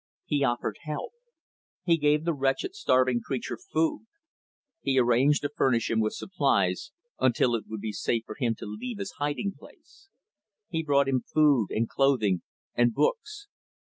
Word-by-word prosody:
He 145 -1 0
offered 120 -2 -1
help. 150 -2 -5 0.7
He 170 -2 +4
gave 150 0 +2
the 170 - +1
wretched, 135 - -1
starving 130 - +2
creature 130 -3 -3 0.2
food. 305 -8 0 0.7
He 135 -1 0
arranged 130 +4 +3
to 145 - 0
furnish 120 -4 +2
him 115 - +2
with 110 -1 +1
supplies, 135 - 0 0.3
until 120 -1 +3
it 115 - -2
would 110 -2 -6
be 110 - -3
safe 115 +2 -1
for - - -7
him 120 -5 -1
to - - -9
leave 200 - -6
his 200 -1 -5
hiding 145 +8 -1
place. 395 - -19 0.6
He 160 -4 -1
brought 140 -3 +2
him 130 -2 +1
food 145 -8 +4
and 115 +1 0
clothing 115 -10 +2 0.3
and 120 -1 +2
books. 430 -4 -1
135 Hz, 160 wpm, -27 LUFS, 120-160 Hz, 0.7 s, He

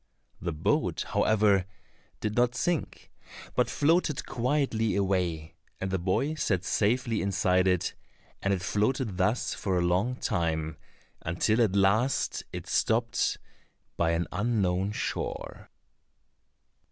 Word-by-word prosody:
The 85 - -2
boat, 75 - 0
however, 100 -3 +3 0.6
did 105 0 -2
not 120 0 +2
sink, 170 +5 -2 0.4
but - - +2
floated 155 -1 +1
quietly 125 -3 0
away, 90 -5 0 0.3
and 95 -1 -3
the 95 - 0
boy 95 - 0
sat 100 - 0
safely 115 +4 +1
inside 95 -1 +2
it, 90 -2 +1 0.5
and 100 - +1
it 95 -2 0
floated 105 +1 0
thus 105 +6 +1
for 95 -3 -1
a - - +2
long 95 +9 +1
time, 80 - -1 0.4
until 105 +8 +1
at 105 -4 +2
last 105 +7 +2
it - - -6
stopped 115 +1 +1 0.6
by 85 -1 +1
an 85 +1 0
unknown 100 -3 0
shore. - - -4
100 Hz, 120 wpm, -28 LUFS, 90-120 Hz, 0.6 s, however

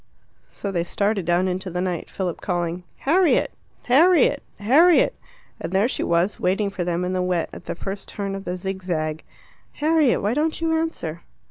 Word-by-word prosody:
So 200 - -5
they 170 -3 0
started 200 +1 0
down 175 +2 +2
into 185 +1 -3
the 180 0 -3
night, 180 -2 -2
Philip 180 -3 -4
calling 175 -1 -2 0.2
"Harriet! 340 +4 +3 0.3
Harriet! 320 +5 +4 0.2
Harriet!" 305 +12 +5 0.5
And - - -5
there 195 +4 +3
she - - -3
was, 170 +4 +1
waiting 200 +2 +1
for 190 -2 -3
them 175 +1 -1
in 180 - -2
the 185 - 0
wet, 180 -2 -1
at - - -10
the - - -4
first 195 +3 -6
turn 200 -1 -4
of 195 0 -5
the 180 0 -4
zigzag. 180 -5 -3 0.5
"Harriet, 305 -6 +2
why 205 +3 +1
don't 310 +3 0
you 325 0 0
answer?" 320 - -2
190 Hz, 175 wpm, -23 LUFS, 180-250 Hz, 0.5 s, Harriet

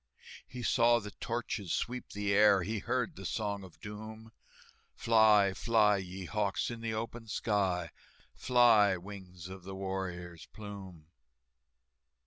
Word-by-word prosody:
He 125 -1 -7
saw 120 -1 +4
the 105 -3 -6
torches 115 -4 -4
sweep 125 +1 -2
the 100 0 -1
air, 100 -2 +5
He 110 +4 -2
heard 125 +1 -1
the 95 - -9
Song 100 0 -2
of 85 -4 -14
Doom, 110 +3 -9 0.6
"Fly, 110 -4 +5
fly, 105 -1 +3
ye 95 0 -6
hawks, 100 +3 -1
in 115 -1 -7
the 115 -1 -2
open 115 +1 -5
sky, 95 -6 0 0.4
Fly, 115 -6 +4
wings 90 -2 -10
of 95 0 -9
the 95 +1 -7
warrior's 90 -3 -5
plume!" 100 -6 -10
105 Hz, 130 wpm, -32 LUFS, 95-110 Hz, 0.6 s, air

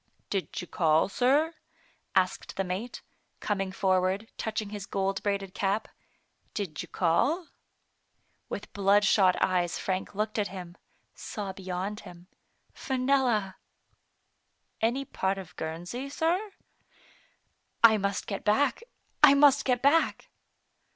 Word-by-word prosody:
"Did 195 -2 -2
you - - -5
call, 160 0 +2
sir? 280 +9 +2 0.6
asked 185 -1 0
the 195 - 0
mate, 190 +7 -5 0.4
coming 195 -2 -2
forward, 190 +2 +1
touching 215 -1 -3
his 205 -1 -6
gold 195 0 -1
braided 195 -2 -2
cap; 200 +2 -1 0.7
"did 185 -7 -3
you - - -8
call?*' 280 - +1 1.0
With - - -6
blood 200 +1 +4
shot 190 -4 +4
eyes 180 -2 +1
Frank 190 +1 -3
looked 215 +1 -1
at 205 - +1
him, 180 -2 -9 0.4
saw 200 -3 -6
beyond 190 +2 -4
him: 175 -3 -12 0.3
" - - -42
Fenella." 255 -7 +1 0.6
" - - -47 0.5
Any 245 +5 +1
part 190 -5 -1
of 180 -2 -9
Guernsey, 175 +12 -5
sir? 340 +8 0 1.3
"I 220 -1 +8
must 200 -1 -2
get 200 - -4
back, 280 - +2 0.4
I 290 -2 +8
must 285 0 +5
get 250 -1 +1
back." 305 +4 +2
200 Hz, 125 wpm, -28 LUFS, 185-245 Hz, 1.3 s, I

